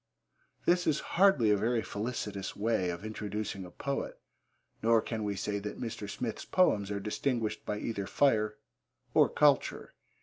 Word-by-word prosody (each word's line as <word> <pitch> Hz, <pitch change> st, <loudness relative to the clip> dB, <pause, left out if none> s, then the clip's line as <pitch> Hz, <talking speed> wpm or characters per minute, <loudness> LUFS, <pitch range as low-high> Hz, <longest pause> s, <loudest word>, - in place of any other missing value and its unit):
This 180 Hz, 0 st, +3 dB
is 150 Hz, -2 st, +3 dB, 0.2 s
hardly 145 Hz, -, +6 dB
a -, -, +5 dB
very 115 Hz, +2 st, +1 dB
felicitous 105 Hz, -3 st, -4 dB
way 105 Hz, -3 st, +1 dB
of 85 Hz, +3 st, -5 dB
introducing 105 Hz, -2 st, -4 dB
a -, -, -9 dB
poet, 140 Hz, +10 st, -4 dB, 0.6 s
nor 115 Hz, 0 st, +5 dB
can 110 Hz, -1 st, -3 dB
we 100 Hz, -1 st, -1 dB
say 100 Hz, +1 st, -2 dB
that 105 Hz, +1 st, -6 dB
Mr. 110 Hz, -4 st, -5 dB
Smith's 115 Hz, +1 st, -4 dB
poems 105 Hz, -, +2 dB
are 100 Hz, -1 st, -2 dB
distinguished 110 Hz, +1 st, -1 dB
by 105 Hz, -, -1 dB
either 105 Hz, -3 st, -3 dB
fire 110 Hz, -6 st, +2 dB, 0.6 s
or -, -, +5 dB
culture. 145 Hz, -2 st, +2 dB
110 Hz, 155 wpm, -31 LUFS, 100-120 Hz, 0.6 s, hardly